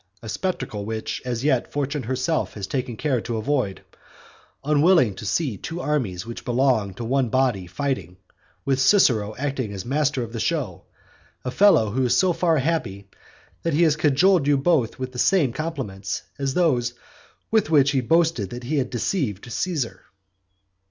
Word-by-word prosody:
A 110 Hz, -, -7 dB
spectacle 130 Hz, -, -3 dB
which 110 Hz, +1 st, -4 dB
as 120 Hz, -1 st, -3 dB
yet 130 Hz, -4 st, +1 dB
Fortune 145 Hz, 0 st, -2 dB
herself 130 Hz, +6 st, -1 dB
has 100 Hz, -2 st, -4 dB
taken 125 Hz, +1 st, -3 dB
care 130 Hz, -4 st, 0 dB
to 115 Hz, 0 st, -3 dB
avoid, 115 Hz, -4 st, -1 dB, 0.8 s
unwilling 150 Hz, -, +4 dB
to 100 Hz, -, -7 dB
see 135 Hz, -, 0 dB
two 165 Hz, -, -6 dB
armies 115 Hz, -, -2 dB
which 115 Hz, 0 st, -7 dB
belong 120 Hz, -6 st, +1 dB
to 115 Hz, -, -5 dB
one 130 Hz, 0 st, +1 dB
body 120 Hz, -7 st, +1 dB
fighting, 95 Hz, -, -3 dB, 0.5 s
with 135 Hz, -1 st, +1 dB
Cicero 120 Hz, -, +3 dB
acting 135 Hz, -5 st, -2 dB
as 95 Hz, -2 st, -6 dB
master 140 Hz, 0 st, 0 dB
of 115 Hz, 0 st, -8 dB
the 115 Hz, -, -4 dB
show; -, -, -2 dB, 0.6 s
a 125 Hz, -, -2 dB
fellow 125 Hz, -, +4 dB
who 130 Hz, +4 st, 0 dB
is 125 Hz, -, +2 dB
so 185 Hz, -2 st, +3 dB
far 165 Hz, -2 st, +2 dB
happy 115 Hz, -10 st, -2 dB, 0.5 s
that 165 Hz, -3 st, -1 dB
he 170 Hz, -, +4 dB
has 155 Hz, -3 st, +4 dB
cajoled 155 Hz, +2 st, +3 dB
you 145 Hz, -1 st, +4 dB
both 135 Hz, -5 st, +1 dB
with 130 Hz, 0 st, -5 dB
the 125 Hz, -, -7 dB
same 155 Hz, -9 st, +3 dB
compliments 125 Hz, -12 st, -4 dB, 0.2 s
as 135 Hz, -1 st, -1 dB
those 125 Hz, -9 st, +2 dB, 0.6 s
with 220 Hz, -7 st, +2 dB
which 145 Hz, -3 st, +4 dB
he 135 Hz, -3 st, +1 dB
boasted 160 Hz, -, +2 dB
that 120 Hz, +3 st, -7 dB
he 145 Hz, +4 st, 0 dB
had 130 Hz, -, -1 dB
deceived 120 Hz, -, -2 dB
Caesar." 130 Hz, -, -2 dB
130 Hz, 170 wpm, -23 LUFS, 115-150 Hz, 0.8 s, unwilling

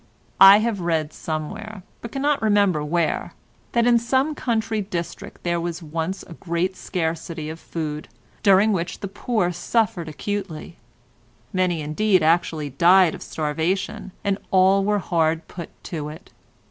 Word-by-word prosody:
I 195 Hz, +1 st, +10 dB
have 215 Hz, -1 st, 0 dB
read 160 Hz, -3 st, -1 dB
somewhere, 195 Hz, +7 st, -5 dB, 0.2 s
but 235 Hz, -, -7 dB
cannot 285 Hz, +1 st, 0 dB
remember 200 Hz, -7 st, +3 dB
where, 165 Hz, +2 st, -1 dB, 0.4 s
that 235 Hz, -1 st, +3 dB
in 240 Hz, -1 st, +5 dB
some 260 Hz, +6 st, +1 dB
country 225 Hz, -5 st, -1 dB
district 190 Hz, +1 st, -6 dB
there 170 Hz, -1 st, 0 dB
was 170 Hz, 0 st, -4 dB
once 165 Hz, +4 st, -3 dB
a 170 Hz, -, -11 dB
great 175 Hz, +2 st, -2 dB
scarcity 165 Hz, -3 st, -3 dB
of 160 Hz, -, -9 dB
food, 155 Hz, -2 st, -5 dB, 0.3 s
during 200 Hz, +1 st, +5 dB
which 175 Hz, -2 st, -3 dB
the 200 Hz, -, -3 dB
poor 195 Hz, -2 st, -1 dB
suffered 180 Hz, -1 st, 0 dB
acutely; 180 Hz, -1 st, -5 dB, 0.8 s
many 180 Hz, -3 st, +1 dB
indeed 185 Hz, +5 st, +2 dB
actually 160 Hz, -2 st, +1 dB
died 175 Hz, +4 st, +5 dB
of -, -, -8 dB
starvation, 165 Hz, +6 st, -2 dB
and 200 Hz, -1 st, 0 dB
all 190 Hz, +1 st, +4 dB
were 210 Hz, +1 st, +2 dB
hard 165 Hz, -3 st, 0 dB
put 170 Hz, -3 st, -8 dB
to 150 Hz, -3 st, -5 dB
it. 155 Hz, +5 st, -12 dB
180 Hz, 145 wpm, -23 LUFS, 160-205 Hz, 0.8 s, I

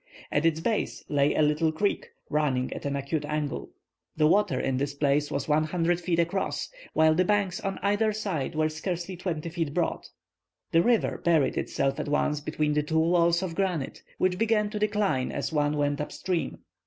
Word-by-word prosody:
At 150 Hz, +3 st, +3 dB
its 160 Hz, -1 st, +1 dB
base 215 Hz, +5 st, -1 dB
lay 145 Hz, 0 st, +2 dB
a 155 Hz, -, +3 dB
little 150 Hz, +2 st, +2 dB
creek, 200 Hz, +6 st, -1 dB, 0.2 s
running 140 Hz, -4 st, +1 dB
at -, -, -7 dB
an 140 Hz, -, -1 dB
acute 140 Hz, +2 st, -2 dB
angle. 150 Hz, -1 st, -3 dB, 0.5 s
The 155 Hz, -, +4 dB
water 160 Hz, -5 st, +3 dB
in 135 Hz, -1 st, 0 dB
this 140 Hz, +1 st, -2 dB
place 145 Hz, 0 st, +1 dB
was 140 Hz, -1 st, -3 dB
100 165 Hz, +3 st, +1 dB
feet 170 Hz, -1 st, 0 dB
across, 170 Hz, +3 st, -1 dB, 0.2 s
while 160 Hz, 0 st, +5 dB
the 180 Hz, +3 st, +3 dB
banks 200 Hz, -2 st, +1 dB
on 195 Hz, 0 st, -3 dB
either 205 Hz, +2 st, +2 dB
side 190 Hz, -9 st, -3 dB
were 155 Hz, 0 st, +2 dB
scarcely 175 Hz, +3 st, -4 dB
20 170 Hz, -3 st, -3 dB
feet 165 Hz, -3 st, -3 dB
broad. 175 Hz, -, -1 dB, 0.6 s
The 165 Hz, -, +5 dB
river 235 Hz, +3 st, +2 dB
buried 160 Hz, -5 st, +3 dB
itself 135 Hz, +1 st, -1 dB
at 150 Hz, -, -3 dB
once 150 Hz, 0 st, +1 dB
between 150 Hz, 0 st, -1 dB
the 150 Hz, -, +2 dB
two 160 Hz, +2 st, -1 dB
walls 170 Hz, +2 st, +3 dB
of 180 Hz, -3 st, -3 dB
granite, 175 Hz, -6 st, -2 dB, 0.2 s
which 185 Hz, 0 st, +1 dB
began 215 Hz, -2 st, +2 dB
to 210 Hz, -, -3 dB
decline 205 Hz, -11 st, +1 dB
as -, -, -3 dB
one 150 Hz, 0 st, +1 dB
went 145 Hz, 0 st, 0 dB
up 150 Hz, -, -4 dB
stream. 180 Hz, -3 st, -2 dB
160 Hz, 190 wpm, -27 LUFS, 150-185 Hz, 0.6 s, while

